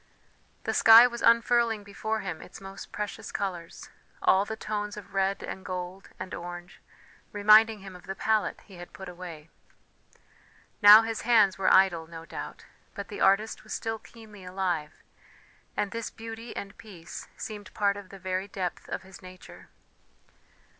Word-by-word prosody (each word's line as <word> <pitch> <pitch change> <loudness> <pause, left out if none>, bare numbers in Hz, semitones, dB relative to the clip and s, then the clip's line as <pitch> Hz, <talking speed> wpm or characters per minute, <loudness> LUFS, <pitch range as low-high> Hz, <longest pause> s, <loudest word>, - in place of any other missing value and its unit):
The - - -1
sky 225 +1 +9
was 235 -1 -3
unfurling 230 -1 +3
before 220 +2 -3
him 180 -4 -5
its - - -12
most 195 0 -10
precious 210 -1 -5
colours, 175 -4 -5 0.3
all 190 +1 +4
the 220 - -5
tones 210 -1 -4
of 195 -3 -11
red 195 0 0
and 190 - -6
gold 185 +1 -6
and 185 - -6
orange, 175 +1 -8 0.5
reminding 215 +1 +5
him 190 -1 -10
of 180 - -14
the 195 - -4
palette 220 0 0
he 195 -4 -15
had 175 0 -11
put 190 - -9
away. 170 -3 -9 1.3
Now 210 +1 +10
his 225 0 -3
hands 215 -5 +4
were 190 - +3
idle, 175 -4 +4
no 165 0 -10
doubt, - - -8 0.3
but 200 -1 -6
the 205 - -7
artist 210 +3 +2
was 215 - -7
still 225 0 -3
keenly 215 -4 -14
alive, 180 -5 -3 0.7
and 205 - -1
this 230 -1 -4
beauty 225 +1 -9
and 200 0 -6
peace 180 -7 -10
seemed 210 -2 -7
part 200 -1 +2
of 200 -2 -10
the 195 - -10
very 190 0 -3
depth 185 -3 -5
of - - -4
his 190 0 -14
nature. 185 0 -13
200 Hz, 160 wpm, -28 LUFS, 185-215 Hz, 1.3 s, Now